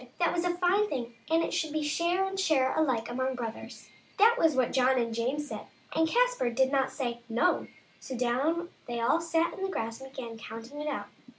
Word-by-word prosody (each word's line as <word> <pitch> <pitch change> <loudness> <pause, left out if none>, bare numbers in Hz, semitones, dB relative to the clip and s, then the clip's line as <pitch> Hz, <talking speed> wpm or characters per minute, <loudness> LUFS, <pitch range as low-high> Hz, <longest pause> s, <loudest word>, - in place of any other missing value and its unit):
that 345 - +2
was 345 - 0
a 350 -1 +1
fine 375 +4 +2
thing, 240 -3 -3 0.2
and 325 +1 +3
it - - -2
should 315 - 0
be 310 0 -1
share 340 +5 +1
and 385 0 -3
share 280 -8 +2
alike 255 -8 +1
among 260 +2 -1
brothers; 230 -3 -7 0.3
that 445 +4 +6
was 325 - +3
what 255 -2 +1
John 260 0 +4
and 230 -2 0
James 260 +6 -1
said, - - -7 0.3
and 320 0 +3
Caspar - - +2
did 260 +3 +2
not 270 -2 +2
say 240 -4 -3
" - - -31
No 240 +11 +2 0.2
;" - - -31
so 260 - -6
down 285 +9 0 0.2
they 240 -1 -3
all 235 +8 +2
sat 330 0 +1
on - - -8
the 385 - -1
grass 230 -8 -3
and 265 - -8
began 235 -4 -7
counting 230 +6 -8
it 300 - -4
out. - - -2
275 Hz, 225 wpm, -29 LUFS, 240-340 Hz, 0.3 s, that